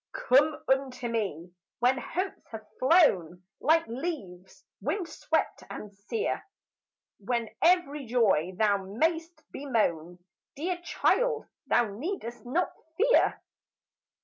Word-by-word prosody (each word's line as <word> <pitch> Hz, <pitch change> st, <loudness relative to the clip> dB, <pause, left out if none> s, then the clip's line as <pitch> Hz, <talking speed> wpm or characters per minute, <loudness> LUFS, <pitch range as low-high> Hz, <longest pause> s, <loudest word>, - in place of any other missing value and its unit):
"Come 290 Hz, +5 st, +3 dB
unto 265 Hz, -2 st, 0 dB
me 185 Hz, -7 st, -3 dB, 0.2 s
when 250 Hz, +2 st, +3 dB
hopes 370 Hz, +8 st, -3 dB
have 220 Hz, -1 st, -8 dB
flown 190 Hz, -, +4 dB, 0.2 s
Like 325 Hz, +3 st, +3 dB
leaves 230 Hz, -, -6 dB, 0.2 s
wind 375 Hz, -5 st, -1 dB
swept -, -, -1 dB
and 210 Hz, -1 st, -8 dB
sere, 205 Hz, -, -3 dB, 0.8 s
When 235 Hz, +2 st, -1 dB
every 315 Hz, -6 st, +3 dB
joy 200 Hz, -8 st, +2 dB
thou 210 Hz, -2 st, +3 dB
may'st 320 Hz, -, -1 dB
bemoan; 180 Hz, -, -1 dB, 0.4 s
Dear 350 Hz, +5 st, -2 dB
child, 470 Hz, +5 st, +1 dB, 0.2 s
thou 235 Hz, -4 st, +2 dB
need'st 240 Hz, -, -5 dB
not 345 Hz, +8 st, 0 dB, 0.3 s
fear. -, -, +3 dB
255 Hz, 105 wpm, -28 LUFS, 205-330 Hz, 0.8 s, flown